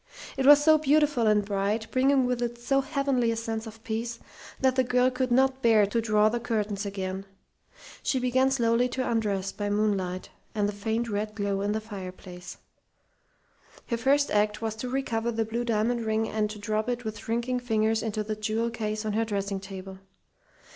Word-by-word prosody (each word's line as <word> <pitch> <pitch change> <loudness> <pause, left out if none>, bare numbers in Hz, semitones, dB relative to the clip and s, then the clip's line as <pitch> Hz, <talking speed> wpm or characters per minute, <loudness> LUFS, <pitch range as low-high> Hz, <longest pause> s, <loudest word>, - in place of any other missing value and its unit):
It 270 0 +1
was 290 0 +8
so 310 0 +6
beautiful 295 -5 +3
and 210 -1 +3
bright, 205 +2 -1
bringing 265 0 +3
with 250 -1 -1
it 240 0 -2
so 270 +3 +1
heavenly 275 -4 0
a 230 - 0
sense 225 0 -4
of 220 0 -12
peace, 230 +1 -3 0.4
that 260 -1 +2
the 260 - +3
girl 250 +1 +2
could 255 0 -1
not 265 +1 +3
bear 225 -3 +5
to 230 +4 -1
draw 215 -1 +3
the 240 +2 0
curtains 210 -3 -2
again. 190 -1 -4 0.8
She 265 - 0
began 260 +1 +2
slowly 240 -1 +2
to 255 +1 -2
undress 200 -4 0
by 205 -1 -3
moonlight 200 -3 -1 0.2
and 205 -1 +1
the 205 - -3
faint 220 +3 -2
red 210 0 -3
glow 200 -1 -1
in 205 +1 0
the 220 - -1
fireplace. 185 -4 -9 1.3
Her 235 - -2
first 280 +4 +2
act 210 0 +2
was 220 -1 -2
to 250 +3 -4
recover 235 -3 -1
the 225 -1 -1
blue 230 +2 -2
diamond 235 +1 0
ring 220 0 0
and 215 -1 -1
to 210 - -7
drop 215 +2 -2
it 245 -1 -3
with 215 -1 -4
shrinking 235 +3 -1
fingers 220 -2 +1
into 215 -1 -2
the 215 +1 -3
jewel 220 +2 -1
case 215 -1 -3
on 215 - -1
her 225 +2 +1
dressing 200 -2 -2
table. 190 0 -9
225 Hz, 190 wpm, -27 LUFS, 210-245 Hz, 1.3 s, was